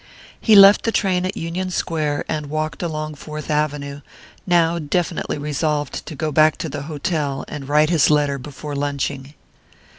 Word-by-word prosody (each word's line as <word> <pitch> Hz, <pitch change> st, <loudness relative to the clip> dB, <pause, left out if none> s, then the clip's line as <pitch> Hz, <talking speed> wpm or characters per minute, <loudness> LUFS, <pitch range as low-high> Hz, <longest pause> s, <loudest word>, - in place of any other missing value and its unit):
He 220 Hz, -, +5 dB
left 200 Hz, 0 st, +9 dB
the 230 Hz, -, +1 dB
train 185 Hz, -4 st, +1 dB
at 190 Hz, -, -5 dB
Union 175 Hz, +3 st, -3 dB
Square, 155 Hz, -5 st, -2 dB
and 150 Hz, -2 st, -3 dB
walked 155 Hz, +1 st, -3 dB
along 155 Hz, -3 st, -3 dB
Fourth 150 Hz, +1 st, -7 dB
Avenue, 145 Hz, -1 st, -2 dB, 0.5 s
now 170 Hz, -1 st, +3 dB
definitely 165 Hz, +1 st, -2 dB
resolved 150 Hz, 0 st, -2 dB
to 155 Hz, -, -6 dB
go 155 Hz, +2 st, -2 dB
back 155 Hz, +1 st, +4 dB
to 160 Hz, -, -4 dB
the 145 Hz, 0 st, -5 dB
hotel 145 Hz, -2 st, -2 dB
and 140 Hz, -2 st, -7 dB
write 150 Hz, +2 st, +3 dB
his 160 Hz, -4 st, +4 dB
letter 145 Hz, -2 st, +2 dB
before 145 Hz, +2 st, -7 dB
lunching. 140 Hz, 0 st, -3 dB
150 Hz, 160 wpm, -21 LUFS, 145-165 Hz, 0.5 s, left